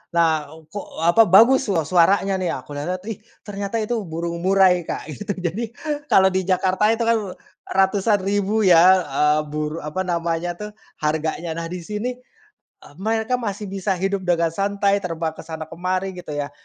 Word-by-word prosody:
Lah, 160 -3 +2 0.2
kok, 205 +1 -6 0.2
apa, 205 +7 +5
bagus 235 +8 +6
sua 175 -6 +1
suaranya, 190 +4 +3
nih! 185 - -1
Aku 130 - -10
lihat-lihat, 175 +6 -4
ih! 215 - -7 0.2
Ternyata 200 +1 -5
itu 230 +2 -1
burung 170 +1 -4
murai, 185 -1 +3
Kak, 155 - -5
gitu. 150 - -5
Jadi, 185 +6 -3 0.4
kalau 190 -5 +5
di 185 -1 -1
Jakarta 190 +2 +2
itu 225 +1 +1
kan, 230 0 +3 0.5
ratusan 195 +2 +2
ribu, 205 +2 +1
ya, 180 +1 +6
eee, 150 +2 +2
buru 150 +1 -3
apa 155 +5 -3
namanya 170 0 -1
tuh, 210 +2 -7 0.3
harganya. 160 +2 -1
Nah, 165 +1 -4
di 175 0 -6
sini, 210 +7 -3 0.7
eee, 145 - -16
mereka 225 +4 0
masih 205 -3 -4
bisa 195 0 -1
hidup 190 +1 -2
dengan 170 -2 +2
santai, 200 +2 +1
terbang 165 -3 -3
ke 160 - -17
sana 160 -1 -6
ke - - -8
mari, 185 +1 -1
gitu 150 -4 -7
ya. 145 0 -3
185 Hz, 175 wpm, -22 LUFS, 165-200 Hz, 0.7 s, bagus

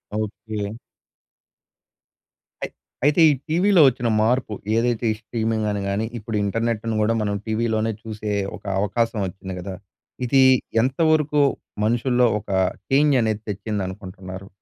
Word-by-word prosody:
Okay. 110 0 -4 1.9
అయి - - -4 0.3
అయితే 150 +3 +4
ఈ - - +5 0.2
టీవీలో 180 +2 +4
వచ్చిన 125 -2 0
మార్పు 120 -1 +1 0.2
ఏదైతే 120 0 +1
ఈ - - -2
స్ట్రీమింగని 110 -3 -1
గాని 100 +3 0
ఇప్పుడు 110 0 -3
ఇంటర్నెట్‌ని 115 +1 -1
కూడా 110 +2 +2
మనం 105 -1 -1
టీవీలోనే 110 0 0
చూసే 105 -1 -5 0.3
ఒక - - -21 0.2
అవకాశం 115 +3 0
ఒచ్చింది 95 +1 -7
కదా! 95 +1 -6 0.5
ఇది 135 +2 +5 0.4
ఎంత 130 +5 -1
వరకు 150 -1 +2 0.4
మనుషుల్లో 120 +2 +2
ఒక 105 0 -15 0.4
చేంజ్ 145 +1 +4
అనేది 110 -2 0
తెచ్చిందనుకుంటున్నారు? 95 -2 -5
110 Hz, 120 wpm, -23 LUFS, 105-120 Hz, 1.9 s, ఈ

